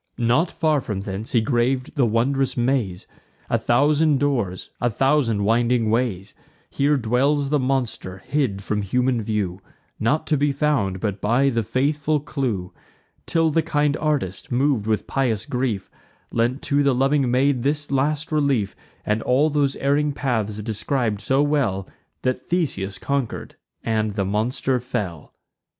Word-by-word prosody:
Not 125 +8 +2
far 155 -3 +1
from 105 -5 -4
thence 100 +2 -5
he 115 - +4
grav'd 125 +4 0
the 135 -5 +3
wondrous 130 +5 +1
maze, 120 -7 0 0.5
A - - +3
thousand 145 +3 +3
doors, 120 -11 -1
a 120 - +2
thousand 125 -3 +2
winding 115 +1 +2
ways: 110 -5 -1 0.4
Here 145 +1 +2
dwells 135 +4 +1
the 150 0 +2
monster, 125 -8 -2
hid 125 -10 -1
from 105 +1 -1
human 125 +4 +1
view, 100 -4 -2 0.4
Not 150 +8 +1
to 155 -1 +1
be 145 +1 +2
found, 125 -11 0
but 100 -2 -2
by 125 +6 +3
the 115 -2 +1
faithful 145 +6 0
clue; 120 - -3 0.5
Till 165 -1 +2
the 165 - +3
kind 145 -2 +1
artist, 140 - -2
mov'd 125 -4 +1
with 110 -1 0
pious 115 -6 -1
grief, 125 -6 -2 0.4
Lent 120 +4 0
to 145 0 +2
the 140 -2 +3
loving 135 0 +2
maid 130 +1 +2
this 145 +2 -1
last 145 +3 0
relief, 140 -9 +1 0.3
And 105 +1 0
all 140 +7 +2
those 145 -2 +1
erring 145 +1 +1
paths 110 -6 -2
describ'd 110 0 -1
so 135 +4 +2
well 135 -11 0 0.4
That 130 0 -1
Theseus 100 - -1
conquer'd 140 +1 -3 0.3
and 110 -2 0
the 100 - 0
monster 120 +6 0
fell. 100 - -5
125 Hz, 150 wpm, -23 LUFS, 110-145 Hz, 0.5 s, he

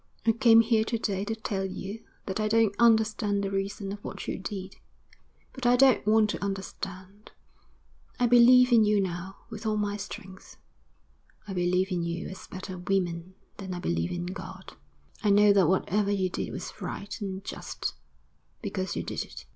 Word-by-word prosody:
'I 225 - +6
came 230 0 +6
here 225 -1 +2
to 230 +1 -1
day 200 -3 -2
to 225 +1 -2
tell 200 -3 -3
you 195 +3 -6 0.2
that 190 +1 -3
I 215 - +1
don't 220 -1 +3
understand 220 -3 +3
the 195 - -2
reason 195 0 -3
of 205 0 -7
what - - -7
you - - -3
did; 190 0 -6 0.8
but 255 -3 -2
I 245 - +6
don't 260 -1 +5
want 215 -1 +4
to - - -5
understand. 195 0 -6 0.9
I 245 - +4
believe 245 +1 +7
in 230 -2 +7
you 210 -1 +3
now 185 0 -3
with 220 -1 -7
all 215 0 +1
my 205 -1 -1
strength. 195 -2 -9 0.9
I 195 - -5
believe 180 +1 +1
in 180 -1 0
you 170 +1 -3
as 190 - -10
better 185 0 -7
women 180 -1 -2 0.2
than 190 -2 -5
I - - -5
believe 85 - -1
in 175 0 -3
God. 185 +3 -8 0.5
I 210 - +3
know 205 0 +6
that 195 -5 +4
whatever 200 +3 +1
you 190 -3 0
did - - -3
was - - -7
right 205 +2 -6
and 195 -1 -4
just - - -5 0.7
because 190 -1 -3
you - - -2
did - - -3
it.' - - -11
200 Hz, 180 wpm, -28 LUFS, 190-220 Hz, 0.9 s, believe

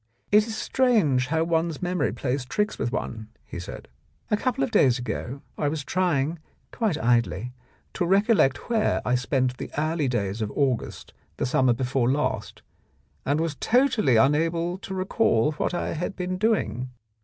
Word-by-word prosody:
"It 210 +1 +5
is 220 -1 -4
strange 200 - +2
how 160 +1 +1
one's 165 -1 0
memory 180 0 0
plays 130 0 -2
tricks 210 +11 -2
with 120 - -1
one," 110 -4 -4 0.2
he - - -7
said. 90 - -8 0.4
"A - - +5
couple 235 - -1
of - - -1
days 130 -3 +4
ago 125 +2 -5 0.2
I 145 - +1
was 150 0 -2
trying 165 -1 0 0.2
— - - -41
quite 215 -9 0
idly 120 -2 +1 0.2
— - - -37
to 175 - -1
recollect 195 - +3
where 225 -2 +1
I 125 - +1
spent 125 0 0
the - - -6
early 155 -1 0
days 105 -3 -2
of 105 - -1
August 135 -5 -1 0.2
the - - -1
summer 130 0 +3
before 125 0 0
last, 145 +3 -2 0.6
and 145 +3 +2
was 165 -2 -1
totally 230 - +2
unable 165 +8 +2
to 190 -1 -6
recall 185 - +2
what 155 +3 -2
I - - -2
had 180 +4 -3
been 185 0 -3
doing. 195 - 0
150 Hz, 170 wpm, -25 LUFS, 125-185 Hz, 0.6 s, It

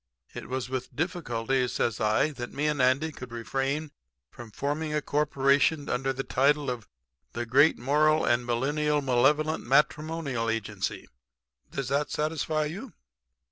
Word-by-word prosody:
It - - -8
was 130 -1 -2
with 130 -1 -5
difficulty,' 135 - -1
says 115 -2 -1
I, 110 +8 +2
'that 120 -4 -7
me 145 +2 -2
and 150 -3 +1
Andy 130 +5 +2
could 125 -4 -10
refrain 135 +6 -2 0.4
from 120 -2 -10
forming 150 +7 -2
a 150 - +1
corporation 145 +1 +2
under 135 +2 0
the 135 +1 -3
title 140 +1 +2
of 120 -3 -6 0.5
the 120 - -3
Great 140 +7 +4
Moral 155 +4 +3
and 120 +1 +2
Millennial 145 +5 0
Malevolent 150 +5 +2
Matrimonial 150 -2 +1
Agency. 115 -3 -3 0.6
Does 140 -2 -4
that 145 +2 0
satisfy 155 0 -1
you?' 200 - -7
140 Hz, 140 wpm, -28 LUFS, 125-150 Hz, 0.6 s, Great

